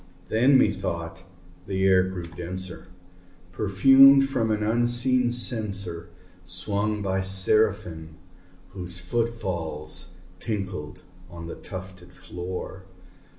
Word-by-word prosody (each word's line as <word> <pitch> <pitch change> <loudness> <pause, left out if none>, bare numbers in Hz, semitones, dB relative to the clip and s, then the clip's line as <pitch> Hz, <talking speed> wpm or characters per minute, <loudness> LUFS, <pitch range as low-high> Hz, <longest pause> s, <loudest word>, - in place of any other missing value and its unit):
Then, 130 +5 +4
methought, 90 -5 -1 0.5
the 95 -1 -2
air 95 -1 +5
grew 95 -1 -4
denser, 90 +2 -5 0.6
perfumed 135 +8 +6
from 120 -5 -1
an 105 -1 0
unseen 120 +2 +2
censer 100 -8 0 0.3
Swung 100 +4 -2
by 95 -1 -1
Seraphim 95 -4 +1 0.5
whose 90 -1 -5
foot 115 +6 -1
falls 85 -9 -5 0.3
tinkled 90 -6 -5 0.3
on 85 -1 -9
the 85 - -7
tufted 95 -2 -10
floor. 90 +2 -7
95 Hz, 100 wpm, -25 LUFS, 90-110 Hz, 0.6 s, perfumed